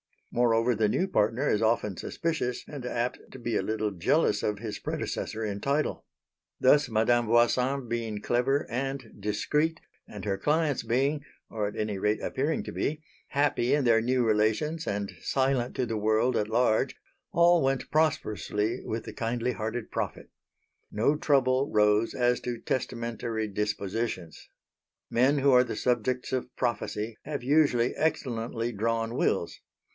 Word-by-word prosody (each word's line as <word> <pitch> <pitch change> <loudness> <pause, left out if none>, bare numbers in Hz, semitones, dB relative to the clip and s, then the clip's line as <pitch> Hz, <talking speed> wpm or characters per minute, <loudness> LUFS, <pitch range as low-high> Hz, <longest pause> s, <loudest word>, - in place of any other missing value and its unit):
Moreover 120 0 +3
the 110 -1 +2
new 185 - +1
partner 115 - +1
is 105 - +2
often 110 -3 +1
suspicious 155 -7 -2
and 140 -4 -7
apt 120 0 -2
to - - -9
be 120 -2 -3
a - - +1
little 110 -1 -1
jealous 90 -4 +2
of 105 -1 -1
his 110 -2 -5
predecessor 110 - -3
in 100 -2 -3
title. 140 +6 -1 0.5
Thus, 145 +1 +5
Madame 115 +1 +2
Voisin 125 +3 +2
being 115 -3 -2
clever 130 +5 +1
and 135 -1 -3
discreet, 150 +10 0 0.3
and 105 -2 -9
her 100 -2 0
clients 150 +2 +1
being 140 +5 +1 0.3
or 105 -2 -1
at 105 - -6
any 105 -2 -2
rate 105 +2 +1
appearing 145 +4 -1
to - - -6
be 155 +1 -2 0.2
happy 140 -3 +1
in 145 - +1
their 115 -2 +4
new 125 +1 +1
relations 110 +10 +1
and 100 -1 -2
silent 130 -2 0
to 130 - 0
the 115 -2 -2
world 110 +4 +2
at 105 - 0
large, 110 0 +2 0.4
all 170 0 +5
went 135 -1 0
prosperously 110 -8 0
with 110 0 -3
the - - -8
kindly 120 +1 -1
hearted 110 0 -4
prophet. - - -4 0.6
No 115 +8 +2
trouble 135 -2 +2
rose 105 +1 +3
as 125 0 +2
to 120 -1 -4
testamentary 115 -3 -2
dispositions. 100 -4 -3 0.6
Men 135 +5 +3
who 140 0 +4
are 125 0 +6
the 120 - -4
subjects 125 +1 0
of 125 -1 -3
prophecy 115 -2 -2
have 145 -3 -4
usually 130 -4 +3
excellently 120 -6 -1
drawn 115 +2 -1
wills. - - 0
120 Hz, 150 wpm, -28 LUFS, 110-135 Hz, 0.6 s, are